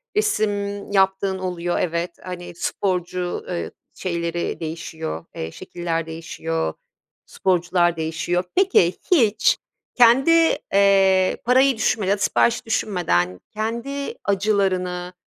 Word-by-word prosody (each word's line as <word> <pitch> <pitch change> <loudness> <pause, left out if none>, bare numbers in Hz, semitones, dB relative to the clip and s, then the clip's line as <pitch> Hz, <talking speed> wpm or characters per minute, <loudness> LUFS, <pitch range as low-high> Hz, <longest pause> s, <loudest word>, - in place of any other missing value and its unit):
resim 205 - -1
yaptığın 190 -1 +2
oluyor 175 -2 -2
evet, 170 0 -1
hani, 175 -1 -7
sporcu, 180 -1 -2
ııı, 175 - -3 0.2
şeyleri 170 -1 -3
değişiyor, 160 0 -5
eee, 80 0 -5
şekiller 165 - -4
değişiyor, 165 - -3 0.5
sporcular 175 -1 +1
değişiyor. 165 +3 -1
Peki, 365 - +4 0.2
hiç 225 - +4 0.4
kendi, 245 +6 +6 0.4
eee, 195 -1 +4
parayı 260 +1 +4
düşünmeden 215 -3 +1
ya 205 - +2
da - - -11
siparişi 235 0 +2
düşünmeden 170 - 0
kendi 235 +6 -3
acılarını, 185 -3 0
185 Hz, 100 wpm, -22 LUFS, 170-205 Hz, 0.5 s, kendi